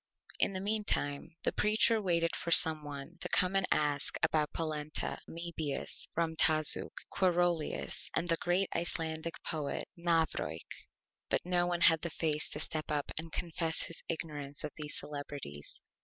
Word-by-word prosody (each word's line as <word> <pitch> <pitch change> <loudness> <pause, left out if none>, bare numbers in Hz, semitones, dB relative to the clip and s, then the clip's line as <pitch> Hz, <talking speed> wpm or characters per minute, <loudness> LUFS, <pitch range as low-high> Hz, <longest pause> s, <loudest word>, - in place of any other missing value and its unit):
In - - +3
the 190 - -3
Meantime 195 -9 -1
the - - +1
Preacher 220 +1 +3
waited 170 -3 +1
for - - -4
some 160 -2 +6
one 140 -2 -8
to - - -4
come 185 0 +4
and 195 -1 +2
ask 145 -2 +1
about 150 -2 +2
Polenta, 155 -2 -3
Amebius, 165 -4 -3
Ramtazuk, 160 -2 +5 0.2
Quarolius 175 -3 0
and 170 - 0
the 165 - +4
great 180 +3 +1
Icelandic 165 -1 -1
Poet, 150 -3 -3
Navrojk. 160 - 0 0.6
But - - 0
no 175 -1 +2
one 175 -1 -1
had 165 -2 +6
the 170 - -2
Face 155 -1 0
to 150 - -5
step 155 0 -3
up 145 -1 -1
and 165 0 -7
confess 165 -1 -1
his 165 - -6
Ignorance 145 -4 -4
of 150 - -4
these 150 -1 -2
Celebrities. 145 - -5
160 Hz, 150 wpm, -32 LUFS, 150-175 Hz, 0.6 s, some